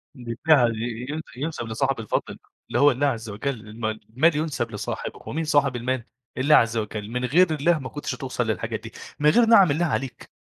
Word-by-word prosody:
بالفعل، 120 0 +2 0.3
ينس 160 +2 -4
ينسب 145 -5 -4
لصاحب 135 +3 -1
الفضل، 110 - -3 0.3
اللي - - 0
هو 145 +2 +6
الله 140 +3 +1
عزّ 115 -4 -3
وجَل، 105 +7 -3 0.2
الما 110 0 -3 0.2
المال 150 +8 +3
ينسب 150 -7 -2
لصاحبه، 105 - -5
ومين 160 +2 -3
صاحب 145 -4 +2
المال؟ 120 0 -2 0.3
الله 145 +4 +5
عزّ 115 -3 +3
وجَل، 105 -1 -4
من 125 +1 -1
غير 165 +5 +4
الله 155 +2 +2
ما 130 - -6
كنتش 145 - -4
هتوصل 130 -4 -3
للحاجات 110 - -2
دي، - - -10 0.3
من 150 +1 +5
غير 235 +7 +5
نِعَم 200 -8 +6
الله 165 +4 +1
عليك 135 -6 -3
135 Hz, 190 wpm, -24 LUFS, 115-150 Hz, 0.3 s, هو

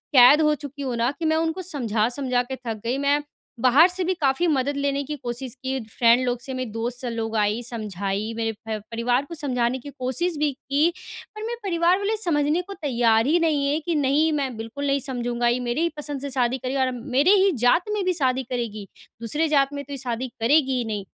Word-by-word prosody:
कैद 255 +5 +8
हो 300 -1 +3
चुकी 285 +1 -8
हूँ 255 -3 -2
ना 235 +3 +1
कि 330 - -2
मैं 315 0 +3
उनको 325 +3 -1
समझा-समझा 250 - 0
के 265 - -1
थक 220 -2 -4
गई, 245 +3 0
मैं 285 +1 +2 0.4
बाहर 265 +8 +6
से 365 0 -3
भी 370 - +1
काफ़ी 310 0 +1
मदद 280 -2 0
लेने 280 0 0
की 300 +2 -5
कोशिश 240 +1 -4
की 265 0 -1
फ्रेंड 235 +2 +3
लोग 245 -1 -1
से, 265 - -6
मेरे 255 -2 -3
दोस्त 240 +3 -4
लोग 225 -1 -3
आई, 210 +3 +1
समझाई 210 -2 -3
मेरे 225 -1 0 0.2
प 220 -1 -2
परिवार 245 +4 0
को 335 - -8
समझाने 255 -4 -1
की 285 - -9
कोशिश 280 +7 -1
भी 295 -1 +1
की 285 +5 +1 0.5
पर 430 - -7
मेरे 470 +1 -3
परिवार 345 -1 +2
वाले 405 +2 -1
समझने 320 -4 +1
को 395 +3 -9
तैयार 235 - +2
ही 335 +3 +3
नहीं 300 -4 +1
है 290 +2 +1
कि 340 -2 0
नहीं 295 +2 +2
मैं 270 -5 -1
बिल्कुल 230 +6 -5
नहीं 275 0 +2
समझूँगा। 240 -2 -2
ये 240 +1 +2
मेरे 265 +7 0
ही 340 - +2
पसंद 290 -2 -4
से 280 - -4
शादी 250 0 +1
करेगी 260 +2 -3
और 260 - +3
अब 245 -2 -5
मेरे 300 +8 +5
ही 395 - +4
जात 340 - +3
में 415 - -1
भी 370 - +2
शादी 265 -4 +1
करेगी 230 -5 -4 0.3
दूसरे 300 +8 0
जात 280 -2 +2
में 285 0 -4
तो 285 - -8
ये - - -4
शादी 250 0 -3
करेगी 265 +1 +3
ही 240 - -1
नहीं। 210 -3 -4
265 Hz, 225 wpm, -24 LUFS, 240-300 Hz, 0.5 s, कैद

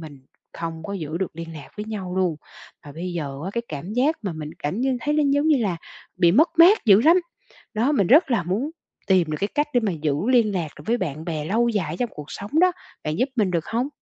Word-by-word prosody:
mình 150 -4 -10 0.3
không 165 -1 -6
có 200 - -6
giữ 160 -4 -4
được 185 -4 -4
liên 165 0 -7
lạc 145 -3 -10
với 210 - -4
nhau 190 -4 -5
luôn. 180 -4 +1 0.5
Và 145 - -10
bây 175 +3 -5
giờ 140 -5 -4
á 190 - -3
cái 235 - -2
cảm 160 +7 -6
giác 280 +6 +2
mà 195 -4 -3
mình 155 -1 -6
cảm 150 +10 -3
như 260 0 +1
thấy 295 +4 0
nó 305 - +3
giống 285 +2 +2
như 305 - +5
là 190 -5 -1 0.4
bị 175 -2 +4
mất 310 - +5
mát 360 +3 +7
dữ 205 -2 +7
lắm. 325 +5 +6 0.6
Đó, 235 +6 +1
mình 200 -11 +2
rất 275 +2 +5
là 205 -6 +2
muốn 210 - -2 0.4
tìm 180 -5 +3
được 150 - -2
cái 200 - 0
cách 295 0 +2
để 245 - +4
mà 220 -4 -1
giữ 155 -3 -1 0.2
liên 230 -5 +4
lạc 170 -4 -1
được - - -11
với 235 +2 +2
bạn 160 - -4
bè 155 -3 -3
lâu 230 +7 +2
dài 205 -6 -1
ở - - -4
trong 245 -2 0
cuộc 150 -1 -9
sống 210 +11 -2
đó. 365 0 +5 0.3
Bạn 155 +4 -3
giúp 255 +3 +2
mình 210 -6 +1
được 170 -3 0
không? 235 +7 -1
195 Hz, 260 wpm, -23 LUFS, 165-245 Hz, 0.6 s, mát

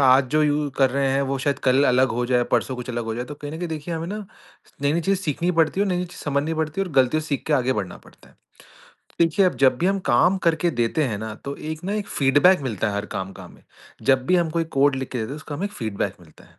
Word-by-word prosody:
आज 130 0 +5
जो 155 0 +3
यू 150 0 +1
कर 135 -2 +4
रहे 135 0 +1
हैं 135 - +2
वो 135 0 -1
शायद 140 +1 -1
कल 130 +2 +4
अलग 130 0 +4
हो 120 +1 -1
जाए, 125 -1 +2
परसों 130 - +1
कुछ 125 0 -7
अलग 120 -1 -3
हो 110 0 -3
जाए, 120 - -3
तो 145 - -8
कहीं 145 0 -8
न 160 - -6
कहीं 175 - -3
देखिए 160 +1 -4
हमें 165 +1 -4
ना 205 - -4 0.7
नई-नई 145 +4 +2
चीज़ें 195 +2 0
सीखनी 165 +3 0
पड़ती 165 +4 +2
है - - +4
और 195 - -1
नई-नई 180 0 -1
चीज़ 175 - -13
समझनी 145 +2 0
पड़ती 160 +3 -2
है - - +1
और 180 - -8
गलतियों 135 +3 +3
सीख 145 -3 -3
के 155 - 0
आगे 130 -1 +2
बढ़ना 100 -6 -4
पड़ता - - -19
है। - - -24 0.8
देखिए 170 +3 +4
अब - - +1
जब 130 -2 +4
भी 175 - +1
हम 195 +1 +2
काम 180 +10 +4
करके 170 +1 +2
देते 120 +6 +1
हैं 110 -6 -2
ना 110 0 -5
तो 140 0 -4
एक 155 +1 -6
ना 195 - -2
एक 210 -1 -3
फीडबैक 145 +7 +4
मिलता 110 -4 -1
है 100 - -3
हर 100 - -3
काम 95 0 -4
का - - -11
हमें, - - -16 0.4
जब 130 -1 +3
भी 185 - +4
हम 170 -2 +1
कोई 165 0 0
कोड 140 0 +4
लिख 130 -1 -4
के 125 - -3
देते 110 - -3
हैं 145 - -5
उसका 150 -1 -8
हमें 190 - -3
एक 205 - -9
फीडबैक 110 - -3
मिलता - - -18
है। - - -24
145 Hz, 285 wpm, -23 LUFS, 130-165 Hz, 0.8 s, आज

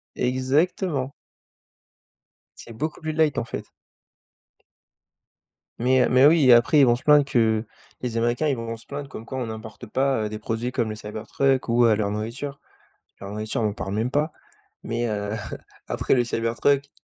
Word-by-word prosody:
Exactement. 135 +3 0 1.5
C'est 115 - -11
beaucoup 155 +8 -4
plus 155 0 -3
light, 155 -2 +2
en - - -1
fait. - - -6 2.1
mais 130 +2 +3
heu, - - +1
mais 130 +2 +6
oui 155 -1 +6
et 120 - +10
après 120 +6 +5
ils 140 - +7
vont 120 - +4
se 120 - -10
plaindre 150 -1 +6
que 115 -5 +1 0.4
les 120 -2 -3
Américains 120 +6 +1
ils 140 - +1
vont 115 -1 -5
se - - -16
plaindre 140 -1 -6
comme 110 - -9
quoi 130 - -6
on 125 -3 -2
n'importe 110 +2 -8
pas 130 -3 0
des 105 0 -6
produits 115 +3 -3
comme 120 -4 -1
le 110 - -4
Cybertruck 110 +6 -1
ou, 120 +1 +4
heu, 110 -2 +5
leur 105 -1 -1
nourriture 120 +7 -5 0.6
leur 100 0 -8
nourriture 110 +2 -3
on 110 - +2
en - - -5
parle 95 -1 -5
même 115 +4 -1
pas 150 +3 +1 0.5
mais 120 +1 -2
heu, 105 -1 -3 0.5
après - - +1
le 120 -2 +2
Cybertruck 120 +5 0
120 Hz, 175 wpm, -24 LUFS, 110-140 Hz, 2.1 s, et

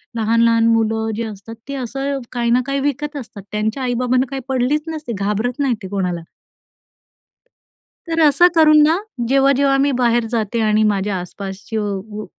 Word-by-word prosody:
लहान-लहान 230 +1 +3
मुलं 225 -1 +1
जे 230 - -2
असतात, 215 +1 -9
ते 280 - -3
असं 275 +2 -3
काही 240 -1 0
ना 250 +1 +4
काही 275 0 -1
विकत 295 +2 -5
असतात. 220 -7 -9
त्यांच्या 220 +5 -2
आई-बाबांना 250 +1 +1
काही 270 - -4
पडलीच 265 +4 +1
नसते, 310 -6 -5
घाबरत 215 +6 -1
नाही 275 -3 +2
ते 190 - -5
कोणाला. 180 -4 -2 1.8
तर 330 0 -1
असं 305 +3 +6
करून 305 -2 +6
ना, 315 +3 +3 0.3
जेव्हा-जेव्हा 275 +1 +3
मी 280 +1 +2
बाहेर 240 -1 +2
जाते 230 0 -1
आणि 215 0 +2
माझ्या 205 -1 0
आसपासचं 200 +2 -5
व 215 - -5
235 Hz, 155 wpm, -19 LUFS, 215-275 Hz, 1.8 s, असं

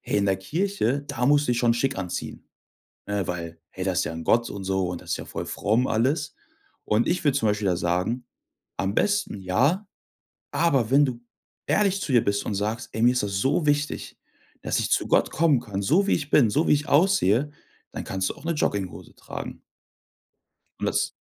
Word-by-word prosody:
„Hey, - - -1
in 100 - +1
der 95 -1 +2
Kirche, 145 - -1
da 125 -3 -1
musst 145 0 +4
du 125 - +2
dich 120 - -1
schon 120 -1 +3
schick 135 -1 0
anziehen. 90 -2 -5 0.6
Ne? 100 -2 -2
Weil 85 -1 -5 0.2
hey, 95 - -3
das 95 -1 0
ist - - 0
ja - - -3
'n 80 - -6
Gott 115 +7 +2
und 100 -1 -6
so 95 -1 0
und 90 - -5
das - - -8
ist - - 0
ja - - -7
voll - - -5
fromm 115 +5 +1
alles." 140 +7 0 0.5
Und 110 +2 +2
ich 175 +1 0
würde 145 -3 +2
zum 110 - +1
Beispiel 105 -1 0
da 90 - +2
sagen, 90 +9 -1 0.5
am 95 +1 -1
besten 205 - +1
ja, 140 - +1 0.6
aber 135 -9 +2
wenn 145 +2 +6
du 125 -3 -4 0.5
ehrlich 200 -1 +2
zu 140 - -3
dir 120 - +5
bist 100 0 0
und 105 - -2
sagst: 110 +5 -3
„Ey, 110 - -2
mir 120 +1 +6
ist 125 - 0
das 100 -1 -2
so 150 - +1
wichtig, 145 0 -1 0.4
dass - - 0
ich - - -1
zu - - +2
Gott - - +2
kommen 155 -5 +3
kann, 105 -5 -5
so 175 - +2
wie - - +3
ich 145 -2 -4
bin, 125 -8 +5
so 155 +7 +1
wie - - +5
ich 150 +1 0
aussehe." 145 - +3 0.4
Dann - - -5
kannst 95 0 -1
du - - -6
auch - - -14
'ne 170 - 0
Jogginghose 100 -10 -3
tragen. - - -8 1.2
Und - - -1
das - - +1
120 Hz, 215 wpm, -25 LUFS, 100-145 Hz, 1.2 s, wenn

